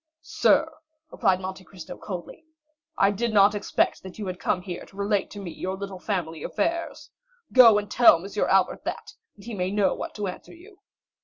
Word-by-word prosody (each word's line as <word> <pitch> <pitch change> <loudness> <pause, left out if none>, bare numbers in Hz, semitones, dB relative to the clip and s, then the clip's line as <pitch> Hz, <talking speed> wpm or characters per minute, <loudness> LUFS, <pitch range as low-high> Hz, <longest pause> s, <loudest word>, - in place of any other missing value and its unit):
"Sir," 320 - +3 0.4
replied 190 -5 +1
Monte 190 0 -7
Cristo 180 -2 -10
coldly, 185 - -8 0.5
"I 195 +1 +4
did 230 +3 -2
not 205 0 +5
expect 205 -1 0
that 190 -1 -11
you 210 - -5
had 185 -1 -5
come 180 -2 -1
here 180 -2 -6
to - - -17
relate 200 -1 0
to 205 - -9
me 185 -4 -6
your 185 +4 -5
little 195 -1 -7
family 170 -6 -3
affairs. 335 - -3 0.4
Go 235 -5 +8
and 205 0 -2
tell 240 -8 +7
M. 170 +4 -6 0.2
Albert 190 -1 +2
that, - - -6 0.2
and 200 - -16
he 235 - -6
may 185 -2 -2
know 205 0 +1
what - - -7
to 210 - -3
answer 185 - -8
you." 380 +3 -17
200 Hz, 190 wpm, -25 LUFS, 185-210 Hz, 0.5 s, Go